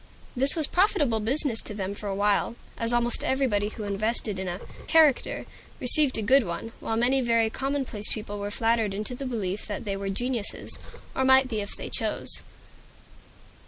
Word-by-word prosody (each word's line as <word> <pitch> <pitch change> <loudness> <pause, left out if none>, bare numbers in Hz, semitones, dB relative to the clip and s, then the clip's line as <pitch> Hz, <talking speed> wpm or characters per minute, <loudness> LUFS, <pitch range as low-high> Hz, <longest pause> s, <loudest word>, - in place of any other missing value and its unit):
This 270 +2 +5
was 315 -3 +5
profitable 320 - +1
business 245 +1 +1
to 210 - -7
them 195 -1 -3
for 205 0 -6
a 195 - -2
while, 205 +3 +1 0.2
as 230 0 +2
almost 240 0 +1
everybody 250 -7 0
who 215 - -8
invested 210 0 -2
in 190 - -4
a 175 +1 -4 0.3
"character" 310 -5 +3 0.3
received 260 +1 +3
a 220 - -2
good 270 +6 +5
one; 200 +2 -5
while 225 - -2
many 255 +3 +2
very 230 -2 +2
commonplace 265 -6 -1
people 205 -2 -2
were 200 0 -4
flattered 225 -1 0
into 215 +4 -2
the 265 +2 -5
belief 210 -5 -3
that 205 -2 -5
they 200 -1 -2
were 195 0 -4
geniuses, 240 +1 0 0.4
or 265 - +1
might 265 0 +5
be 220 -3 -2
if 200 - -6
they - - -7
chose. - - +1
225 Hz, 180 wpm, -26 LUFS, 205-260 Hz, 0.4 s, This